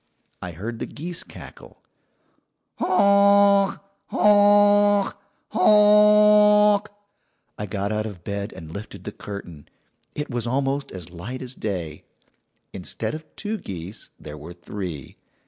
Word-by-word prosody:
"I 90 -2 -6
heard 115 +7 -7
the - - -4
geese 170 +3 -7
cackle. - - -14 1.0
"'Honk! 200 +1 +4 0.3
honk! 205 -1 +4 0.3
honk!' 210 0 +5 0.7
"I 105 - -3
got 100 +1 -3
out 110 0 -2
of 95 -5 -10
bed 100 +2 -5
and 80 -1 -11
lifted 100 +1 -9
the - - -6
curtain. 90 -8 -10 0.5
It 150 -1 -5
was 120 -1 -3
almost 135 +2 -2
as 90 -2 -10
light 110 +10 -7
as 125 0 -7
day. 90 -10 -5 0.7
"Instead - - -5
of 155 +1 -7
two 215 0 -4
geese 95 +3 -8
there 75 0 -10
were 80 +4 -10
three. 85 -5 -8
130 Hz, 120 wpm, -23 LUFS, -, 1.0 s, honk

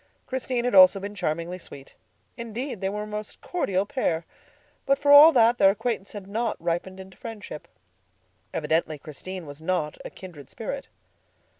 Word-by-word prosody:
Christine 255 -2 -2
had 245 - 0
also 190 +1 +8
been 200 +1 -6
charmingly 175 -1 -3
sweet. 140 -5 -12 0.4
Indeed, 235 -1 -5
they 190 - 0
were 210 +1 -4
a - - -6
most 210 0 -6
cordial 200 - -1
pair. 175 - -1 0.6
But 275 0 +4
for 285 0 +2
all 295 +3 +11
that, 235 -1 +4
their 195 - +7
acquaintance 205 0 -2
had 205 -3 -7
not 220 +3 -2
ripened 175 +3 -3
into 190 0 -12
friendship. 215 -9 -8 0.8
Evidently 160 -1 0
Christine 170 +5 -8
was 145 +1 -10
not 160 -3 -2
a - - -6
kindred 165 -8 -12
spirit. 270 +5 -6
195 Hz, 160 wpm, -25 LUFS, 175-235 Hz, 0.8 s, all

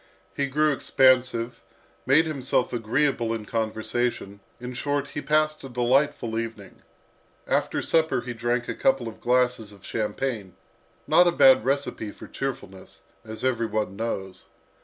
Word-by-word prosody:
He 140 - 0
grew 150 +3 +2
expansive, 125 -4 +2 0.5
made 150 +5 +5
himself 135 -5 -1
agreeable 120 0 0
in 110 -2 -6
conversation, 110 -1 -2 0.2
in 125 +1 -6
short, 145 +2 -2
he 145 - -5
passed 155 +2 +1
a 135 - -7
delightful 125 -1 +1
evening. 115 -4 -7 0.6
After - - 0
supper 160 -6 +2
he 120 0 -6
drank 120 +1 -1
a - - -2
couple 130 -3 +1
of 110 - -9
glasses 125 -3 +1
of 100 -1 -16
champagne 110 -3 -3 0.5
not 170 +4 +5
a - - +4
bad 130 -8 +6
recipe 135 -4 -1
for - - -12
cheerfulness, 100 -8 -6 0.2
as 110 +2 -8
every 120 -3 +1
one 105 -3 -2
knows. 100 -4 -5
125 Hz, 140 wpm, -25 LUFS, 110-135 Hz, 0.6 s, bad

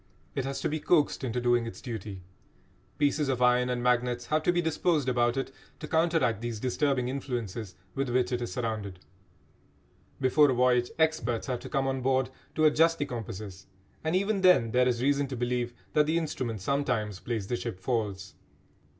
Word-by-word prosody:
It 135 - -2
has 135 0 -3
to - - 0
be 155 +1 -2
coaxed 150 -3 +2
into 125 -1 -1
doing 120 -1 +2
its 115 - -8
duty. 105 -6 -6 0.7
Pieces 145 0 +1
of 130 -2 0
iron 125 0 +3
and 125 -1 -1
magnets 125 0 +1
have 155 0 +1
to 175 - +2
be 175 - 0
disposed 160 -3 +1
about 120 0 +2
it 135 0 -2 0.3
to - - -6
counteract 160 - +2
these 120 -2 -4
disturbing 130 +1 0
influences 120 -7 -4 0.2
with 135 -1 -2
which 125 0 +1
it 125 -1 -1
is 120 - -4
surrounded. 110 -6 -3 1.2
Before 140 +3 +4
a 130 - +2
voyage 125 -1 +3
experts 155 -8 +1
have 125 -3 -2
to - - -9
come 135 -1 0
on 135 -1 -1
board 130 0 +1 0.2
to 155 - +3
adjust 165 +2 +4
the 145 - -1
compasses, 105 -7 -7 0.4
and 160 +2 0
even 200 +1 +1
then 180 -12 +5
there 125 +1 +3
is 120 -1 0
reason 140 0 +2
to 130 -1 -5
believe 120 0 -1 0.2
that 150 -1 +4
the 160 +2 +2
instrument 125 - -3
sometimes 115 -6 -1
plays 115 -3 -3
the 120 - -2
ship 115 -6 -5
false. 100 -4 -2
125 Hz, 185 wpm, -29 LUFS, 115-145 Hz, 1.2 s, then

